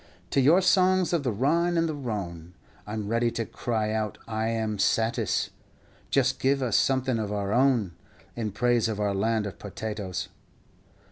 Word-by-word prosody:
To 135 - +3
your 160 +8 +5
songs 185 -1 +3
of 170 - +2
the 130 -3 -1
Rhine 165 +10 +1
and 165 0 +2
the 155 - -2
Rhone 95 - -5 0.3
I 105 - -5
'm 105 -2 -3
ready 115 +2 +1
to 115 - -2
cry 110 -1 -2
out 110 -1 -2
I 110 0 -1
am 110 -2 -1
satis; 115 +4 +1 0.6
Just 130 -1 +2
give 135 0 +2
us 120 -5 0
something 130 -3 +2
of 105 -2 -3
our 100 -1 -2
own 125 -6 +3 0.4
In 110 -3 -3
praise 120 +2 +2
of 105 -2 -3
our 105 -1 0
Land 110 +2 0
of 100 - -7
Potatoes. 105 -2 -5
115 Hz, 175 wpm, -27 LUFS, 105-135 Hz, 0.6 s, your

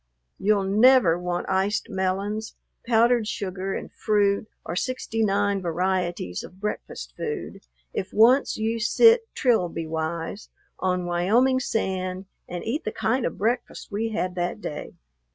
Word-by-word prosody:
You'll 205 -1 +2
never 210 -3 +5
want 175 0 -3
iced 195 +4 0
melons, 200 +2 -2 0.3
powdered 235 -1 +4
sugar, 190 -2 -3
and - - -6
fruit, 205 -1 +1 0.2
or 170 - -4
sixty 225 0 -1
nine 200 -1 +1
varieties 175 - -1
of 185 - -12
breakfast - - -5
food, - - -5 0.3
if 185 - -3
once 245 +6 +4
you 225 +1 -1
sit 455 - +5
Trilby 180 -10 +1
wise 165 +4 -4 0.3
on 180 -1 0
Wyoming 215 +10 +3
sand 190 -5 -2 0.2
and 175 -1 -5
eat 260 +8 -2
the 215 - -2
kind 245 +4 0
of - - -6
breakfast 235 +3 -2
we 220 +3 -1
had 185 -4 -2
that 175 +3 -2
day. 150 -8 -6
200 Hz, 135 wpm, -25 LUFS, 180-225 Hz, 0.3 s, never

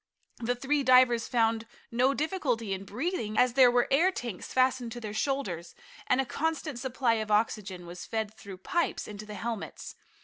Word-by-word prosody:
The 245 +1 0
three 280 +4 0
divers 255 -2 +5
found 225 -2 +1 0.2
no 255 +4 +3
difficulty 270 - -1
in 190 +1 -5
breathing, 230 - -3
as 250 -1 +4
there 255 -1 +7
were 245 0 +3
air 335 +8 +4
tanks 235 - -6
fastened 255 -2 +2
to 240 - -6
their 215 -3 -6
shoulders, 215 - -2 0.3
and 255 - +3
a 270 - +2
constant 310 -1 -2
supply 250 -1 +1
of 215 - -5
oxygen 210 -4 0
was 175 +1 -8
fed 220 -1 -2
through 195 -3 -10
pipes 340 - -1
into 210 0 -8
the 210 - -7
helmets. 225 +1 -5
240 Hz, 175 wpm, -29 LUFS, 215-265 Hz, 0.3 s, there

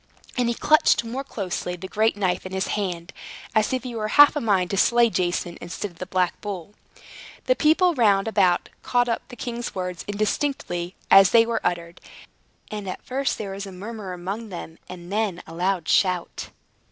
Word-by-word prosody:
And 245 -2 +1
he 235 - -1
clutched 305 -3 +4
more 250 +4 -4
closely 185 -7 -4
the 185 +2 -8
great 220 +2 +1
knife 185 -3 0
in 185 - -8
his 190 0 -1
hand, 180 -4 -3 0.4
as 215 -1 +2
if 255 -2 -1
he 250 -2 -6
were 215 -2 -2
half 290 +7 +7
a 295 - -1
mind 195 -5 +1
to 195 - -1
slay 235 +3 +4
Jason, 175 -1 -1
instead 175 +4 -5
of 170 - -22
the 185 - -5
black 185 -2 0
bull. 200 -2 -6 0.7
The - - +3
people 345 +2 +4
round 210 -7 +3
about 190 -5 +2
caught 245 0 +1
up 230 - -1
the 245 - -10
king's 240 0 -5
words, 180 -2 -4
indistinctly 205 -4 -2 0.2
as 195 -1 +9
they 230 -1 +6
were 230 -1 -1
uttered; 170 -1 -3 0.7
and 205 -3 -4
first 270 +1 -1
there 200 -2 -5
was 195 +1 -6
a - - -8
murmur 205 +1 -7
amongst 195 +5 -5
them, 170 -3 -8
and 180 0 -9
then 210 -5 -1
a 165 - -11
loud 180 0 -1
shout. 180 -3 +1
200 Hz, 190 wpm, -24 LUFS, 180-230 Hz, 0.7 s, as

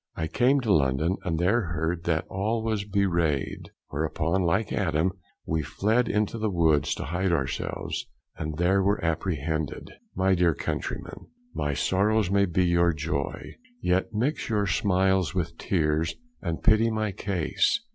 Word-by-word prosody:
I 80 - -2
came 130 - +2
to 110 -5 +2
London, 75 +5 +2
and 85 -4 -1
there 100 +8 +3
heard 85 +2 -2
that 80 -1 +1
all 110 +4 -1
was 110 -3 -1
bewrayed; 85 -8 0 0.2
whereupon, 80 +4 -1
like 95 +5 +1
Adam, 85 -2 +1 0.3
we 80 0 0
fled 110 - +1
into 105 +2 0
the 110 0 0
woods 80 -6 +2
to - - -5
hide 90 +5 -1
ourselves, 70 -5 -2 0.3
and 75 -1 -4
there 95 +3 +3
were 100 +2 +2
apprehended. 80 -3 -2 0.2
My 95 +1 +3
dear 85 -3 +3
countrymen, - - -5 0.3
my 75 -1 -1
sorrows 100 +3 +2
may 100 0 +4
be 90 +1 +1
your 85 0 +3
joy, 70 -2 -3 0.3
yet 95 +5 +1
mix 120 +8 -1
your 105 -2 +1
smiles 95 -2 +1
with 85 -2 -2
tears, 80 -3 0 0.3
and 85 -2 -3
pity 110 +1 +5
my 110 -2 -1
case. 95 - 0
90 Hz, 150 wpm, -26 LUFS, 80-100 Hz, 0.3 s, pity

